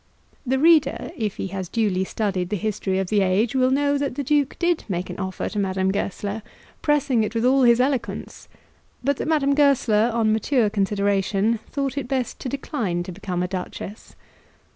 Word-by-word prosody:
The 265 +2 +2
reader, 320 +1 +3
if 215 -4 -2
he 190 - -4
has 190 -2 -5
duly 200 -4 +1
studied 190 -4 -2
the 210 - -1
history 205 -2 -2
of 190 -1 -1
the 210 -2 +3
age, 195 +5 +2
will 255 -1 +3
know 285 +1 +2
that 280 -3 -2
the 285 - -2
Duke 285 0 +1
did 345 -1 +1
make 180 -1 -3
an - - -8
offer 190 -1 -3
to 210 - -3
Madame 190 -1 0
Goesler, 200 +2 -3 0.4
pressing 275 -6 +2
it 215 +2 -4
with 230 +1 +1
all 265 +2 +4
his 240 -1 +5
eloquence, 265 0 -2 0.6
but 280 +1 +1
that - - -3
Madame 290 -3 +2
Goesler, 250 -6 +3
on 225 -2 +2
mature 220 0 +1
consideration, 200 +1 +1
thought 275 -1 -2
it 265 - -6
best 255 -2 -2
to 255 - -4
decline 225 - -2
to 185 - -7
become 180 -1 -3
a - - -1
duchess. 190 +3 -7
220 Hz, 185 wpm, -23 LUFS, 195-270 Hz, 0.6 s, his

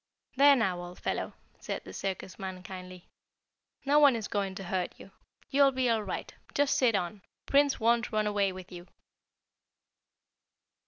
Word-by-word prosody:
"There 280 +1 +7
now, 190 -8 0
old 175 0 -9
fellow," - - -3 0.3
said - - -5
the - - -10
circus 190 -1 -5
man 185 -1 -6
kindly. 185 -2 -9 0.8
"No 290 +2 +5
one 285 -4 +6
is 220 -2 -3
going 195 -2 -2
to 195 - -6
hurt 185 0 -2
you. 195 - -13 0.4
You'll 275 0 +5
be 255 -2 +1
all 225 -1 +1
right. 200 - -5 0.2
Just 285 -1 +3
sit 240 -4 +3
on. 190 +2 -2 0.2
Prince 280 0 +3
won't 235 +1 +2
run 215 -1 +1
away 205 -2 +1
with 185 0 -10
you." 175 0 -10
205 Hz, 160 wpm, -30 LUFS, 185-255 Hz, 0.8 s, There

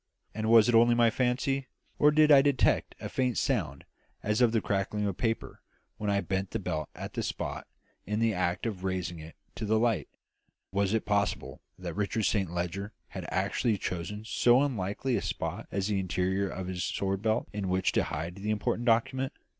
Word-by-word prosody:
And 110 0 -2
was 115 -1 +7
it 120 - +2
only 120 +1 +6
my 120 -1 +4
fancy, 130 +3 0 0.3
or 150 - +7
did 155 0 +5
I 140 -2 +9
detect 140 -1 +2
a - - -5
faint 125 -2 0
sound 90 - -1 0.4
as 105 +3 +1
of 120 -2 +5
the 115 - +2
crackling 100 +1 -1
of 100 -3 -1
paper 115 -1 -2 0.4
when 105 - -2
I 100 0 +2
bent 95 0 -2
the - - -2
belt 75 -1 -3
at - - -7
that - - -2
spot - - -4 0.4
in 105 +1 -1
the 115 -1 +2
act 90 +1 -1
of 100 -5 -3
raising 90 -3 -2
it 80 +1 -11 0.2
to - - -7
the 110 +1 +2
light? 115 -3 +1 0.6
Was 100 +2 +1
it 110 - -1
possible 100 -1 -1 0.2
that 90 -2 -5
Richard 105 +3 -1
Saint 95 -2 +1
Leger 90 +4 -3 0.2
had - - -7
actually 110 -4 0
chosen 95 +4 -4
so 120 +3 +4
unlikely 120 0 -1
a - - -2
spot - - -4
as 95 -1 -1
the 100 -2 +1
interior 95 +1 0
of 95 0 -5
his 90 -1 -3
sword 95 0 -1
belt 110 +1 0
in 100 -2 -2
which 95 +1 +1
to - - +1
hide 85 +5 -4
the 100 +2 -4
important 110 +2 -1
document? 130 +3 +2
105 Hz, 195 wpm, -29 LUFS, 95-115 Hz, 0.6 s, I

